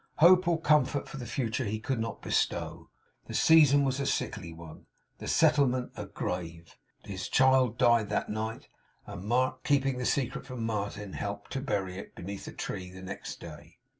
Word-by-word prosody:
Hope 180 +3 +6
or 170 -1 +2
comfort 150 -3 +2
for - - -8
the 125 -3 -6
future 120 0 -1
he 110 +1 -2
could 125 +2 -2
not 115 0 -4
bestow. - - -1 0.4
The - - -6
season 150 -3 +6
was 135 0 0
a 140 - -1
sickly 85 - -2
one; 80 -1 -12 0.3
the - - -7
settlement 140 -5 +3
a - - -6
grave. 85 -2 -5 0.3
His 95 -2 -5
child 130 -3 +4
died 120 -4 +4
that 105 - -1
night; 110 +1 -4 0.4
and 90 - -8
Mark, 125 +5 0
keeping 135 -3 +1
the 125 - -2
secret 130 -1 -1
from 125 -3 -4
Martin, 105 -2 -3
helped 100 0 -5
to 135 - -2
bury 95 -8 -2
it, - - -11
beneath 100 +2 -7
a - - -6
tree, 90 -1 -5
next 95 +1 -7
day. - - -11
120 Hz, 175 wpm, -29 LUFS, 100-135 Hz, 0.4 s, Hope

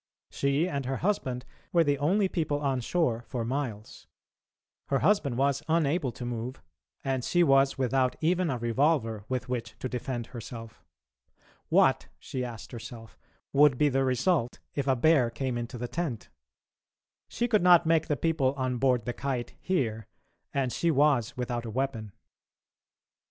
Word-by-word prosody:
She 140 +5 +1
and 140 -6 -3
her 135 0 -1
husband 130 -11 -1 0.3
were 170 -1 +4
the 145 -2 +1
only 190 +7 +2
people 155 -5 -1
on 135 -3 0
shore 120 -4 0
for 120 -3 -3
miles; 120 -5 -4 0.8
her 135 - +2
husband 160 - +2
was 140 +1 +1
unable 160 -3 +1
to 125 - -7
move, 120 +2 -4 0.4
and 130 -2 -1
she 175 +6 +3
was 135 -2 +4
without 130 0 +1
even 175 +2 +1
a 130 - -1
revolver 115 -2 +1
with 130 -1 -2
which 120 -3 -4
to - - -4
defend 125 -1 -4
herself. 115 -1 -9 0.9
What, - - +3
she 130 - -5
asked 120 -2 -7
herself, 115 -2 -9 0.4
would 140 -2 +5
be 150 +2 +3
the 135 0 +1
result 130 +1 +1 0.2
if 140 -1 -2
a 135 - +4
bear 135 -2 +4
came 125 +2 -3
into 120 +1 -4
the 120 +1 -4
tent? 150 -7 -4 1.0
She 240 - -1
could 215 -3 +3
not 175 -1 +6
make 160 -1 +2
the 150 -3 0
people 145 -3 +1
on 130 -2 -1
board 125 -3 +2
the 120 - -2
Kite 130 -3 -3
hear, 115 - -1 0.4
and 135 -3 -1
she 170 - +1
was 140 -7 +2
without 120 -1 -2
a 115 - -6
weapon. 115 -3 -3
135 Hz, 160 wpm, -28 LUFS, 120-150 Hz, 1.0 s, not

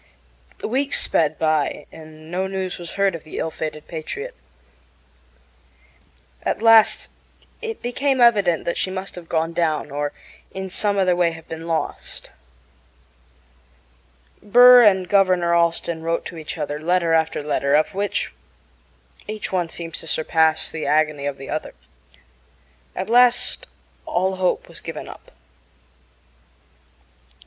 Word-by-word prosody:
Weeks 270 +5 0
sped 155 -1 +1
by, 155 -3 0
and 155 0 -13
no 185 +2 -1
news 190 -1 -4
was 170 -1 -7
heard 200 -1 +2
of 165 - -7
the 155 - -9
ill 160 - -2
fated 155 -1 -6
Patriot. 160 -2 -6 2.1
At - - -2
last 225 -1 +5 0.5
it 450 -1 -6
became 265 +2 0
evident 205 -8 +4
that 170 - -2
she - - 0
must 190 +1 -5
have 175 -2 -11
gone 165 0 0
down 155 -4 -1
or 145 0 -2 0.4
in 190 -1 -5
some 205 +1 +1
other 185 -2 +3
way 175 -1 +2
have 160 0 -12
been 165 +1 -7
lost. 165 -1 -4 2.1
Burr 245 +4 +8
and 190 -4 +4
Governor 185 -3 +3
Allston 170 -1 +1
wrote 165 +1 -2
to 170 - -7
each 155 - -6
other 150 -1 -3
letter 170 +1 +1
after 160 -2 +1
letter, 145 -1 +1
of 155 - +2
which 200 +1 -2 0.9
each 215 0 -5
one 180 -3 -1
seems 165 0 -5
to 165 - -9
surpass 160 0 +2
the 160 - -4
agony 150 -2 +1
of 140 -1 -4
the 135 - -10
other. 155 - -4 1.2
At 185 - -3
last 245 +1 +3 0.4
all 190 +1 0
hope 185 -1 0
was - - -14
given - - -7
up. - - -12
170 Hz, 135 wpm, -22 LUFS, 160-195 Hz, 2.1 s, Burr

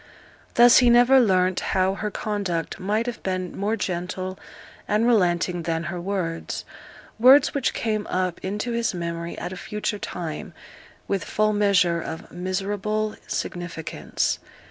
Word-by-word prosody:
Thus 240 0 +8
he 245 -2 +5
never 245 +3 +6
learnt 185 -5 +3
how 190 0 +1
her 210 +2 -3
conduct 200 -6 -3
might 210 +4 0
have 245 -1 -5
been 185 -1 -3
more 205 +3 0
gentle 185 -1 -4 0.5
and 215 +2 +2
relenting 180 -6 +2
than 165 0 -2
her 175 - -4
words 175 -3 -3 0.5
words 265 +6 +7
which 280 -4 0
came 215 -2 -1
up 185 -2 -1
into 205 +5 -2
his 235 -4 0
memory 170 0 -4
at 175 +2 -5
a - - -6
future 210 +1 -3
time, 165 -6 -6 0.5
with 195 -3 -1
full 215 0 +1
measure 190 -5 +3
of 160 - -7
miserable 200 +4 -2
significance. 175 -2 -3
190 Hz, 140 wpm, -24 LUFS, 175-215 Hz, 0.5 s, Thus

